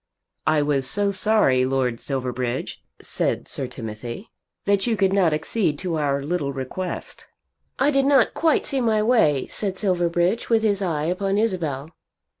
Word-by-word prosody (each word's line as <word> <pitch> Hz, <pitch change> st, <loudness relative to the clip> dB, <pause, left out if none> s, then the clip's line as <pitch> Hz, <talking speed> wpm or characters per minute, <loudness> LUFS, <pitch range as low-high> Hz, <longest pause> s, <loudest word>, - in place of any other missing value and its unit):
"I 155 Hz, -1 st, +3 dB
was 140 Hz, -3 st, +1 dB
so 205 Hz, -1 st, +3 dB
sorry, 190 Hz, -10 st, +3 dB
Lord 130 Hz, -2 st, 0 dB
Silverbridge," 125 Hz, -2 st, -4 dB, 0.2 s
said -, -, -2 dB
Sir -, -, -4 dB
Timothy, 115 Hz, -, -8 dB, 0.3 s
"that 200 Hz, +2 st, +2 dB
you 225 Hz, -2 st, +1 dB
could 195 Hz, -1 st, +2 dB
not 185 Hz, -5 st, +3 dB
accede 155 Hz, +1 st, 0 dB
to 170 Hz, -2 st, -3 dB
our 140 Hz, -1 st, 0 dB
little 145 Hz, -2 st, -2 dB
request." 140 Hz, +7 st, -6 dB, 0.5 s
"I 280 Hz, +2 st, +3 dB
did 275 Hz, -1 st, +2 dB
not 280 Hz, -1 st, +4 dB
quite 325 Hz, -2 st, +1 dB
see 270 Hz, -2 st, 0 dB
my 220 Hz, -3 st, +2 dB
way," 155 Hz, -, +3 dB
said 195 Hz, -3 st, -3 dB
Silverbridge, 175 Hz, +1 st, 0 dB
with 225 Hz, -1 st, +3 dB
his 205 Hz, -2 st, +1 dB
eye 160 Hz, -5 st, -1 dB
upon 195 Hz, +3 st, -1 dB
Isabel. 165 Hz, -9 st, -2 dB
175 Hz, 155 wpm, -23 LUFS, 140-205 Hz, 0.5 s, not